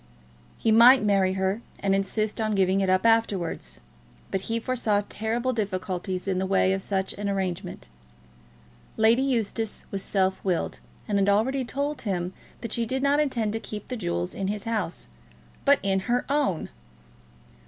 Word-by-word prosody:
He 225 - +1
might 240 +3 +8
marry 195 -2 +3
her, 190 +3 -1 0.2
and 195 -1 +1
insist 210 +3 0
on 215 -1 0
giving 190 0 +2
it 190 - +1
up 185 +3 +2
afterwards; 185 - +1 0.5
but 195 - -1
he 230 +3 -2
foresaw 225 -4 0
terrible 235 +4 -1
difficulties 185 -3 -3
in 185 -1 0
the 190 - -1
way 190 0 +3
of 195 - -2
such 190 -1 -2
an 205 -1 -1
arrangement. 190 - -3 1.1
Lady 225 +3 +4
Eustace 225 -4 -1
was 195 - -2
self 190 -1 0
willed, 180 -3 -1 0.3
and 205 -1 +1
had 195 0 +3
already 255 +7 +2
told 285 +4 -3
him 180 -3 -2 0.3
that 230 -2 -4
she 235 - 0
did 265 +3 -2
not 285 +1 +3
intend 235 -8 0
to 225 - -1
keep 210 -2 -8
the 255 - -2
jewels 90 - -2
in 195 - -3
his 205 0 -3
house, 215 -7 -3 0.6
but 280 0 +6
in 195 -1 +2
her 240 +5 0
own! 275 - 0
205 Hz, 165 wpm, -26 LUFS, 190-230 Hz, 1.1 s, might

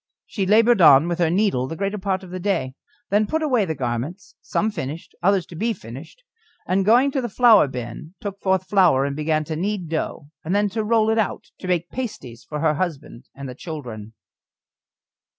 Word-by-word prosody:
She 195 -3 -3
laboured 225 +1 +5
on 150 0 +7
with 175 0 -2
her 170 -2 +3
needle 175 -9 +1
the 165 - -5
greater 200 +4 -2
part 190 -1 -2
of 180 - -11
the 185 - -5
day, 175 -9 -1 0.4
then 210 +1 +3
put 315 +6 -1
away 250 -9 +2
the 160 -3 -3
garments, 135 - -4
some 220 - -1
finished, 150 -2 -6
others 190 0 +2
to 170 - -12
be 225 +7 0
finished, 140 - -11 0.4
and 190 +1 +1
going 245 +7 +4
to 270 - -1
the 240 - -3
flour 225 - +6
bin 125 +6 -7
took 200 -1 -6
forth 190 -1 +1
flour 180 -9 +4
and 140 0 -3
began 155 +1 0
to 155 +1 -5
knead 185 0 -2
dough, 155 -2 -4
and 175 +5 -1
then 205 0 +2
to 220 +2 -2
roll 220 0 +2
it 225 - +1
out 215 - -2
to 185 - -7
make 175 -2 -1
pasties 130 - -6
for 150 -1 -5
her 160 -2 +3
husband 150 -7 -5
and 140 0 -7
the 125 - -6
children. 125 - -8
185 Hz, 205 wpm, -22 LUFS, 150-210 Hz, 0.4 s, on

